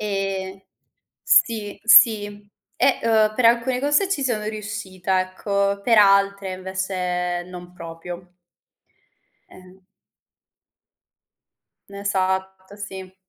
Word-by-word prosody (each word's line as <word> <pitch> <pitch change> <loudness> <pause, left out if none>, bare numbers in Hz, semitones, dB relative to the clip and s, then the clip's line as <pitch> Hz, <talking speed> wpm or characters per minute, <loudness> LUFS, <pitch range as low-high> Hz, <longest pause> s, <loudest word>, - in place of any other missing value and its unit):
Ehm 195 -2 -4 0.6
sì, 225 - +1
sì. 210 -3 +4 0.3
E, 275 - +2
uhm, 220 -2 +2
per 245 -1 +1
alcune 235 +2 +2
cose 290 +8 +1
ci 295 -8 -1
sono 220 -5 -2
riuscita, 205 -4 -3
ecco, 200 +2 -2
per 230 0 +3
altre 200 -1 +3
invece 185 -2 -3
non 180 0 -11
proprio. 175 +1 -10 1.2
Eh 185 +1 -17 2.1
Esatto, 190 -1 -3
sì. 190 -2 -9
200 Hz, 90 wpm, -22 LUFS, 185-215 Hz, 2.1 s, sì